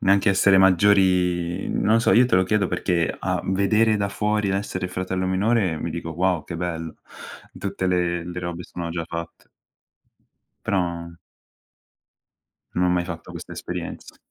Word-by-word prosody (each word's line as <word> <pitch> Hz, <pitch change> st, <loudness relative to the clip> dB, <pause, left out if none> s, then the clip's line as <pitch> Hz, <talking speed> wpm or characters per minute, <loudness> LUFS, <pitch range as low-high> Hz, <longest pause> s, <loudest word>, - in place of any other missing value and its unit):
neanche 100 Hz, +2 st, +3 dB
essere 95 Hz, 0 st, +5 dB
maggiori 90 Hz, -2 st, +3 dB
non 110 Hz, +2 st, +2 dB
so, -, -, +3 dB
io 120 Hz, +2 st, +6 dB
te 125 Hz, -, +1 dB
lo 95 Hz, -, +4 dB
chiedo 105 Hz, 0 st, +1 dB
perché 85 Hz, -3 st, 0 dB
a -, -, -1 dB
vedere 105 Hz, +3 st, +2 dB
da 100 Hz, 0 st, -1 dB
fuori 105 Hz, 0 st, 0 dB
l'essere 95 Hz, -2 st, -2 dB
fratello 95 Hz, 0 st, -2 dB
minore 95 Hz, -3 st, +1 dB
mi -, -, -4 dB
dico: 80 Hz, -, -5 dB
"Wow, 90 Hz, -1 st, 0 dB
che 85 Hz, -, -6 dB
bello!" 85 Hz, -2 st, -4 dB, 0.6 s
Tutte 100 Hz, -2 st, -3 dB
le 85 Hz, -1 st, 0 dB
le 90 Hz, 0 st, -5 dB
robe 85 Hz, 0 st, -5 dB
sono 85 Hz, -1 st, -6 dB
già 85 Hz, -1 st, -3 dB
fatte. 85 Hz, 0 st, -7 dB, 1.2 s
Però 85 Hz, -4 st, -2 dB, 1.6 s
Non 90 Hz, -, +2 dB
ho -, -, +3 dB
mai 90 Hz, -1 st, +1 dB
fatto 85 Hz, -2 st, -8 dB
questa -, -, -9 dB
esperienza. -, -, -7 dB
90 Hz, 150 wpm, -23 LUFS, 85-100 Hz, 1.6 s, io